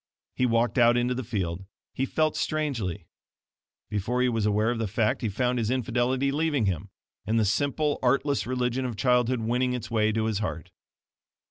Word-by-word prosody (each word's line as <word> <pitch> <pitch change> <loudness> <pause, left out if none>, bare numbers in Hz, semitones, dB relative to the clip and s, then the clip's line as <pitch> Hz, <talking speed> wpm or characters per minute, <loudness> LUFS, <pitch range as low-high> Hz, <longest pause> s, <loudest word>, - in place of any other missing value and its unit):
He 125 - +2
walked 120 +2 +1
out 120 0 +5
into 120 +1 +1
the 130 +1 -3
field. 95 -6 -3 0.3
He 135 - -1
felt 155 +2 +1
strangely. 115 - -2 0.8
Before 110 +5 -1
he 125 - +3
was 115 -3 0
aware 105 +2 +2
of 120 - -3
the 110 - -1
fact 110 +2 0
he 115 - -1
found 125 +4 0
his 110 -2 -1
infidelity 130 +2 0
leaving 150 -5 +1
him, 95 +1 -2 0.4
and 115 +1 +2
the 110 - +3
simple, 145 +7 0
artless 140 +2 +1
religion 125 0 -1
of 125 -3 -3
childhood 125 0 +2
winning 125 +3 0
its 120 -2 -5
way 110 -1 +2
to 110 0 0
his 110 -3 -1
heart. 80 -7 -4
120 Hz, 185 wpm, -27 LUFS, 110-130 Hz, 0.8 s, out